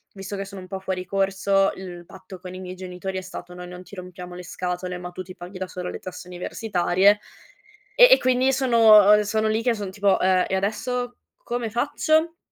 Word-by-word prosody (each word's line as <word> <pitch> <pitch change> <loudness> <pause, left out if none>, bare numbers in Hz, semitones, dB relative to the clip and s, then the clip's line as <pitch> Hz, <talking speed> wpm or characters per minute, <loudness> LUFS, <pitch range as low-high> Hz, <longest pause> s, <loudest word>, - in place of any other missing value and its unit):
visto 195 +1 -6
che 195 0 -4
sono 195 -1 -9
un 185 - -11
po' 190 0 -5
fuori 185 -1 -4
corso, 195 0 +1
il 175 -2 -9
patto 190 0 -12
con 180 0 -9
i - - -7
miei 185 0 -7
genitori 185 +1 -6
è - - -7
stato: 180 -1 -9
"Noi 180 0 -9
non 180 +1 -9
ti 185 - -19
rompiamo 180 -1 -9
le 180 - -8
scatole, 180 +1 -4
ma 180 0 -7
tu 185 - -7
ti 185 0 -11
paghi 180 +1 -10
da 185 - -3
sola 180 0 -6
le - - -6
tasse 185 -1 -9
universitarie" 185 +2 +1 0.8
e - - +9
e - - +9
quindi 255 +1 +2
sono 220 -5 +6
sono 215 +1 0
lì 220 +1 +1
che 240 -2 +2
son 200 -3 -5
tipo: 200 0 +2
"Ehm, 185 -1 +3
e 190 - 0
adesso 245 +5 -2 0.3
come 240 -2 -3
faccio?" 310 +7 +1
190 Hz, 210 wpm, -24 LUFS, 180-215 Hz, 0.8 s, e